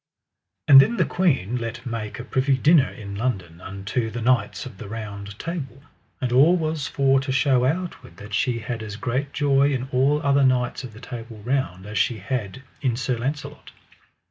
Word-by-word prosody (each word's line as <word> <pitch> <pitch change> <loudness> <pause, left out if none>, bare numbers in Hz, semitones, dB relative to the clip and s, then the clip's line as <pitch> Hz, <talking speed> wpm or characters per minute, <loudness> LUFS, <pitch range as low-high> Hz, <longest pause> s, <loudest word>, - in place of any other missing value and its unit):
And 135 -1 +11
then 235 +11 +1
the 185 - +3
queen 130 - +1
let 115 0 -5
make 115 -3 -4
a 120 - -6
privy 130 +1 +1
dinner 150 0 +5
in 100 -4 -9
London 95 -7 -3
unto 100 +5 -3
the 115 +2 -5
knights 115 -4 +1
of 95 - -10
the - - -7
Round 100 -2 -7
Table. 140 -5 -6 0.4
And 125 -2 -2
all 145 +8 +6
was 155 -3 -2
for 135 -1 +3
to 135 0 -3
show 130 -2 +3
outward 160 - -3
that 105 +1 -10
she 120 +3 +1
had 115 0 -5
as 105 -2 -6
great 130 +5 -2
joy 140 -1 +3
in 130 -1 -2
all 135 +4 +3
other 140 0 +3
knights 125 0 +1
of 120 -4 -8
the 110 - -12
Table 115 -2 -8
Round 120 -8 -1
as 105 +1 -3
she 120 - +1
had 105 +2 -4 0.2
in 130 -5 +1
Sir 125 +1 -1
Launcelot. 140 +4 -5
125 Hz, 190 wpm, -23 LUFS, 110-140 Hz, 0.4 s, And